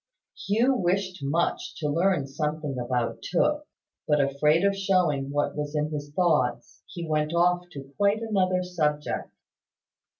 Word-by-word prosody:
Hugh 230 +6 +3
wished 185 -1 0
much 170 - -1
to 150 - -3
learn 165 0 +1
something 150 +1 -3
about 120 -1 -2
Tooke; 300 - 0 0.4
but, 150 -1 +3
afraid 145 +4 +2
of 200 0 +2
showing 180 -8 +1
what 145 +1 -1
was 150 0 -4
in 150 +1 0
his 145 -1 -5
thoughts, 150 -7 0
he 170 -3 -6
went 155 +1 0
off 175 +1 +2
to 140 0 -10
quite 205 +2 +2
another 185 -4 +1
subject. 150 -5 -2
160 Hz, 140 wpm, -26 LUFS, 145-185 Hz, 0.4 s, Hugh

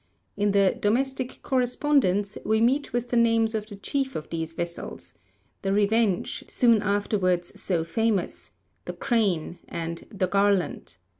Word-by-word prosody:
In 205 0 +1
the 195 -1 +3
Domestic 260 +4 -1
Correspondence 245 -6 +1
we 220 +1 +2
meet 260 +6 +2
with 240 0 -2
the 245 - -1
names 230 -1 +3
of 215 -1 -3
the 205 - -8
chief 265 +6 -2
of 155 - -6
these 165 -1 -3
vessels, 170 0 -5 0.5
'The 195 - -1
Revenge,' 205 -1 +1
soon 230 -4 +3
afterwards 200 -4 0
so 175 -4 0
famous, 210 +3 -1 0.4
'The - - -4
Crane,' 195 -8 0
and 165 0 -5
'The 190 -3 -1
Garland.' 200 - 0
205 Hz, 140 wpm, -26 LUFS, 185-235 Hz, 0.5 s, the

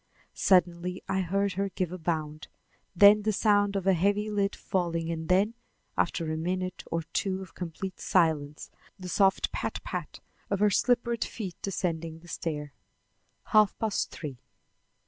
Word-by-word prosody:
Suddenly 180 0 +2
I 190 0 0
heard 195 +2 0
her 195 +2 -1
give 180 -2 -2
a 185 - -6
bound, 155 -2 -3 0.5
then 205 +3 +8
the 215 +1 +1
sound 205 -1 +3
of 195 -2 -1
a 195 - +5
heavy 205 +4 +1
lid 200 -1 0
falling 170 -3 -1
and 160 -1 -5
then, 195 +5 +3 0.4
after 165 -2 0
a 155 - -2
minute 185 +2 -2
or 165 0 -1
two 190 -1 -1
of 185 - -14
complete 180 +2 -6
silence, 155 -4 +1 0.3
the 185 -2 -8
soft 195 +1 +3
pat - - -3
pat - - -5 0.3
of 200 - +1
her 210 0 +4
slippered 235 +1 +2
feet 195 -6 -6
descending 165 -4 -2
the 170 +1 -16
stair. 150 -4 -4 0.8
Half 215 -2 +4
past 220 -3 -1
three. 140 -6 -7
185 Hz, 155 wpm, -28 LUFS, 165-200 Hz, 0.8 s, then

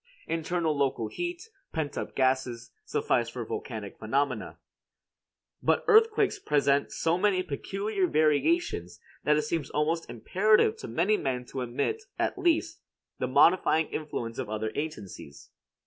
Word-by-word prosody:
Internal 165 -1 -1
local 135 -6 0
heat, 350 +3 -5 0.2
pent 155 -3 -3
up - - -5
gases, 130 -3 0
suffice 115 -1 0
for 120 -1 -5
volcanic 110 -3 -6
phenomena; 125 +1 -1 1.0
but - - +2
earthquakes 435 -2 +4
present 140 -1 +2
so 165 +2 0
many 190 -2 +2
peculiar 195 +6 -2
variations 155 - +1 0.3
that 150 0 +4
it 150 - +1
seems 150 -2 -2
almost 160 +3 -1
imperative 195 - +3
to - - -7
many 175 - +2
men 125 -6 -2
to 130 - -5
admit, 125 - -2 0.2
at - - 0
least, 340 -2 +1 0.4
the - - 0
modifying 160 +3 +4
influence 120 -7 -4
of - - -4
other 110 0 -2
agencies. 105 - -7
150 Hz, 130 wpm, -28 LUFS, 125-190 Hz, 1.0 s, earthquakes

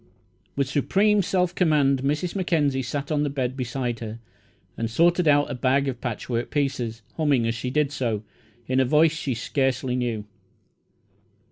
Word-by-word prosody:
With 140 -1 0
supreme 200 +9 +2
self 180 -1 0
command 145 -7 +2
Mrs. 150 +7 -1
Mackenzie 150 -8 +1
sat 140 +4 -4
on 150 -1 +1
the 145 - 0
bed 130 -2 -2
beside 125 -2 -3
her 110 -1 -6 0.6
and 115 0 -2
sorted 170 +7 +3
out 145 -1 +4
a - - -2
bag 135 +2 +1
of 125 -3 -4
patchwork 120 0 -3
pieces, 120 -6 -2
humming 145 -7 +2
as 115 - 0
she 120 +2 -4
did 145 +2 +1
so, 115 -7 -2 0.4
in 130 +2 +1
a 130 - +4
voice 155 +4 +4
she 140 -5 -3
scarcely 130 +1 -1
knew. 120 -4 -2
135 Hz, 160 wpm, -24 LUFS, 125-150 Hz, 0.6 s, out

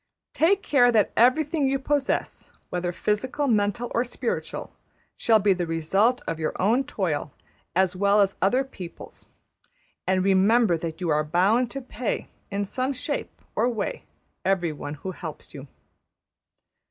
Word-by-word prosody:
Take 385 +5 +3
care 245 -4 +4
that 215 -3 +3
everything 285 +5 +3
you 270 +1 +1
possess, 280 0 -1 0.2
whether 175 0 -1
physical, 230 +10 -1
mental, 215 -1 +1
or 235 - +2
spiritual, 245 - -4 0.4
shall 225 -1 +4
be 205 -1 +3
the 175 -2 -3
result 195 +10 +1
of 165 -1 -3
your 155 - -3
own 230 +8 +2
toil 160 - -2 0.4
as 185 0 +2
well 200 +2 +3
as 195 -1 +3
other 250 +8 +3
people's; 190 -10 -11 0.8
and 185 0 +2
remember 195 +1 +4
that 165 +1 -5
you 175 - -1
are 150 0 +2
bound 195 +10 +2
to 275 +2 -5
pay, 245 -2 -4 0.2
in 200 0 -2
some 255 +7 -2
shape 250 - -5
or 235 +3 +2
way, 250 - -3 0.4
everyone 170 -6 -1
who 185 +6 -6
helps 165 -4 -9
you. 140 0 -9
205 Hz, 145 wpm, -25 LUFS, 180-250 Hz, 0.8 s, care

